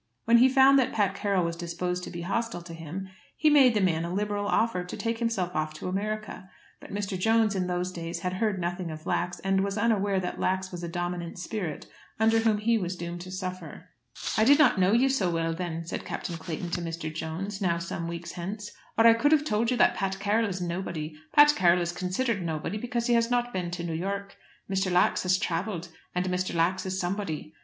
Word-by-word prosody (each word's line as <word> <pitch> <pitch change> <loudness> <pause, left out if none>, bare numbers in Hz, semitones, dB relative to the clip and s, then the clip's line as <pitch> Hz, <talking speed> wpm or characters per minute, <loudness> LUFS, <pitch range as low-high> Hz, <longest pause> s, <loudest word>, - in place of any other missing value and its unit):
When 235 +1 +6
he 255 +2 +7
found 270 +1 +6
that 260 -1 +1
Pat 205 -3 +2
Carroll 195 -4 0
was 170 0 -2
disposed 180 +1 -3
to - - -7
be 170 - -6
hostile 200 0 -2
to 170 -1 -9
him, 165 +4 -6 0.3
he 310 -1 +4
made 265 -5 +6
the 210 - +3
man 165 -3 +2
a 170 - -4
liberal 205 +1 -1
offer 220 -6 +1
to 180 - -7
take 230 0 -2
himself 200 -7 -1
off 155 0 -1
to 155 - -6
America. 210 +1 -4 0.3
But - - -12
Mr. 200 -1 -3
Jones, 225 +1 +3
in 185 -2 -1
those 180 0 -1
days, 170 -1 -5
had 180 +1 -2
heard 210 +1 0
nothing 175 0 -3
of 155 0 -8
Lax, 175 0 -1
and 195 0 +1
was 200 +1 -2
unaware 205 -3 +2
that 180 -1 -4
Lax 190 0 0
was 175 -1 -6
a - - -2
dominant 175 0 -4
spirit 180 -3 -4 0.3
under 225 0 +4
whom 225 -2 +2
he 225 +2 +2
was 180 -1 -3
doomed 175 0 -6
to 185 +1 -8
suffer. 185 -2 -6 0.5
"I 215 - +4
did 280 +5 +7
not 295 -10 +5
know 185 +1 +4
you 240 +4 +4
so 265 -9 +1
well 165 -1 0
then," 165 -1 -4
said 170 - -4
Captain 170 - -4
Clayton 165 +1 -5
to 175 - -1
Mr. 165 -2 -4
Jones, 185 +6 -4
now 170 -3 +2
some 170 0 -4
weeks 170 0 -5
hence, 205 +4 -6 0.3
"or 225 - +5
I 230 - +9
could 280 +6 +2
have 300 -1 +4
told 225 -2 +1
you 250 - +1
that - - +5
Pat 190 -1 -2
Carroll 210 +2 +1
is 190 -1 -4
nobody. 170 -3 -4 0.2
Pat 295 0 +8
Carroll 175 -6 +4
is 170 - -2
considered 190 +5 -1
nobody, 165 +5 -3
because 240 0 -2
he 240 - +2
has 230 0 +3
not 245 0 0
been 180 -2 -2
to 175 0 -4
New 170 -1 -3
York. 200 +4 -3 0.3
Mr. 190 -1 0
Lax 180 0 +3
has 185 0 +2
travelled, 180 -1 -2 0.3
and 180 0 0
Mr. 180 -1 -1
Lax 180 +3 +1
is 190 0 -2
somebody. 175 -5 -3
185 Hz, 225 wpm, -28 LUFS, 175-215 Hz, 0.5 s, I